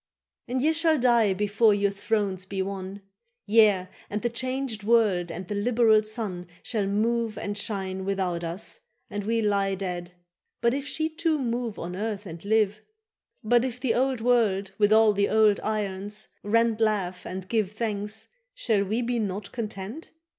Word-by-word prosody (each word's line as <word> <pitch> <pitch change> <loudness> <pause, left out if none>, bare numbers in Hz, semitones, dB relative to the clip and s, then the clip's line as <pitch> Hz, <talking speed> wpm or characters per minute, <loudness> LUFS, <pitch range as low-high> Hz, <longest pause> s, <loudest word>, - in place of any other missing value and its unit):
—And 255 +1 -1
ye 315 +2 +4
shall 320 -1 +3
die 235 -5 +4
before 210 +2 +3
your 200 0 +1
thrones 200 -2 -1
be 190 0 -2
won. 195 0 -6 0.4
—Yea, 205 -4 +4 0.2
and 210 +2 -3
the 240 - 0
changed 255 -2 -2
world 205 -6 +3
and 175 +2 -6
the - - -3
liberal 220 +1 +4
sun 215 -5 -4 0.2
Shall 210 -4 -1
move 225 +2 0
and 205 0 -3
shine 190 -2 -3
without 190 -3 -1
us, 170 - -5 0.3
and 205 0 -3
we 225 +1 +1
lie 200 -2 +1
Dead; 180 -2 -5 0.5
but 235 0 +2
if 280 +1 -3
she 315 +2 -1
too 320 0 0
move 240 -4 -2
on 180 +2 -5
earth 210 0 -3
and 165 -2 -8
live, 215 0 +2 0.6
But 240 +2 +4
if 250 -1 -3
the 250 -3 +1
old 260 -1 +1
world 215 -5 +2
with 205 0 +4
all 220 -1 +6
the 200 0 +1
old 215 -2 +4
irons 210 0 -3
rent 230 +1 +2
Laugh 195 -5 0
and 185 0 -6
give 215 -2 +1
thanks, 215 -1 -3 0.3
shall 220 - +1
we 220 +5 -1
be 240 0 -1
not 200 -1 -3
content? 220 +5 -6
215 Hz, 170 wpm, -26 LUFS, 195-235 Hz, 0.6 s, all